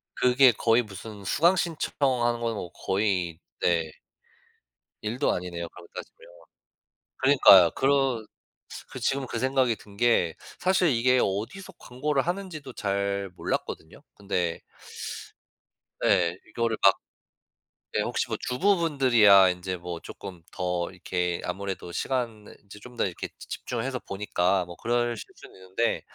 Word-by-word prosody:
그게 125 0 +5
거의 115 +3 +3
무슨 105 -1 -9
수강 170 - +4
신청처럼 140 -6 0
하는 120 0 +1
거는 115 -1 -2
뭐 90 -4 -6
거의 95 -5 -1 0.2
네. 80 -3 +1 1.1
일도 120 +6 0
아니네요, 85 -1 -4
그렇게 90 -1 -15
따지면. - - -9 1.0
그니까요. 100 - +7
그런 135 -5 +2 0.6
그 - - -8
지금 135 -1 0
그 115 - -4
생각이 130 -3 +2
든 100 -1 -16
게 115 -8 +2 0.2
사실 185 -2 +3
이게 125 0 +3
어디서 150 - -3
광고를 135 +2 -1
하는지도 175 -7 -5
잘 100 -2 -2
몰랐거든요. 80 - -4
근데 90 -4 -2 1.4
예. 90 -2 +3
이거를 115 0 -1
막 95 - +8 1.0
네 - - +3
혹시 - - -1
뭐 - - -2
주부분들이야 125 - +5
인제 90 +1 -4
뭐 85 -1 -6
조금 90 -3 -9
더 90 0 -2
이렇게 90 -1 -2
아무래도 95 -1 -5
시간을 115 -5 -3
이제 100 +1 -12
좀 125 +1 -13
더 - - +2
이렇게 90 - -5
집중을 120 -1 -5
해서 130 -2 -3
보니까 95 -2 0
뭐 85 0 -10
그러실 120 +2 0 0.2
수는 - - -15
있는데 95 +5 -1
110 Hz, 285 characters per minute, -27 LUFS, 90-130 Hz, 1.4 s, 막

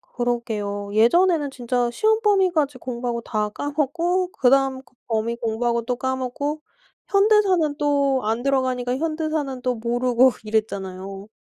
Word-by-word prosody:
그러게요. 215 -5 -2
예전에는 295 - +3
진짜 245 -1 -1
시험 440 - +2
범위까지 365 -9 +2
공부하고 240 -1 -4
다 215 -2 -2
까먹고 330 - -1
그다음 265 0 +2
그 - - -27
범위 225 0 -1
공부하고 235 +1 -1
또 250 +1 -1
까먹고 260 +4 -3 0.5
현대사는 395 -7 +3
또 280 -2 +2
안 225 +3 -1
들어가니까 255 -2 0
현대사는 310 -4 -2
또 250 -1 0
모르고 245 +2 +2
이랬잖아요. 195 -2 -3
255 Hz, 325 characters per minute, -23 LUFS, 235-295 Hz, 0.5 s, 예전에는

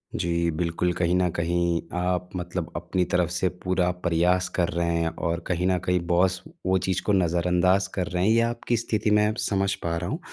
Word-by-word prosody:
जी, 85 0 0
बिल्कुल, 85 +2 -1
कहीं 85 0 0
न 90 -1 +2
कहीं 85 0 0 0.2
आप 90 0 -1
मतलब 90 -1 -4
अपनी 90 +1 -1
तरफ 90 -2 +2
से 90 +1 +1
पूरा 90 -1 +1 0.2
प्रयास 90 +2 +2
कर 85 -2 +1
रहे 85 +1 -1
हैं 85 0 +1 0.2
और 85 0 -1
कहीं 90 0 0
न 95 -1 +2
कहीं 90 0 +2
बॉस 90 +1 +2 0.2
वो 95 0 +3
चीज़ 95 0 -1
को 105 - +1
नज़रअंदाज़ 90 +1 +2
कर 90 -3 -2
रहे 90 0 -1
हैं 110 - +5
या 115 0 +3
आपकी 120 0 -1
स्थिति 110 -2 -1
मैं 105 0 +4
अब 110 - -1
समझ 100 -2 0
पा 85 0 -1
रहा 85 +2 -3
हूँ। 155 - -3
90 Hz, 210 wpm, -25 LUFS, 85-95 Hz, 0.2 s, हैं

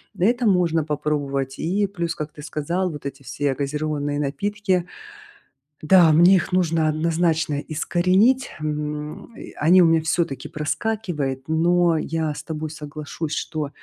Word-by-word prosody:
на 180 - -2
этом 240 0 +2
можно 170 -4 +2
попробовать. 140 -3 -2
И 200 +5 0
плюс, 170 -4 -3
как 150 +1 -6
ты 150 - -11
сказал, 170 +5 -2
вот 150 -4 -8
эти 140 0 -6
все 140 +1 -1
газированные 145 +1 -2
напитки. 185 +5 -1 1.0
Да, 170 -1 +6
мне 175 +5 +6
их 170 - -3
нужно 165 -3 +2
однозначно 160 -1 0
искоренить. 185 - +2
М, 150 +6 -5
и - - -9
они 180 +4 +5
у - - +5
меня 165 0 +4
всё-таки 160 -3 -1
проскакивает, 150 -4 -3
но 170 +1 +3
я 160 -1 -2
с - - -7
тобой 155 -1 -5
соглашусь, 150 +1 -6
что, 150 -3 -3
160 Hz, 145 wpm, -22 LUFS, 150-175 Hz, 1.0 s, Да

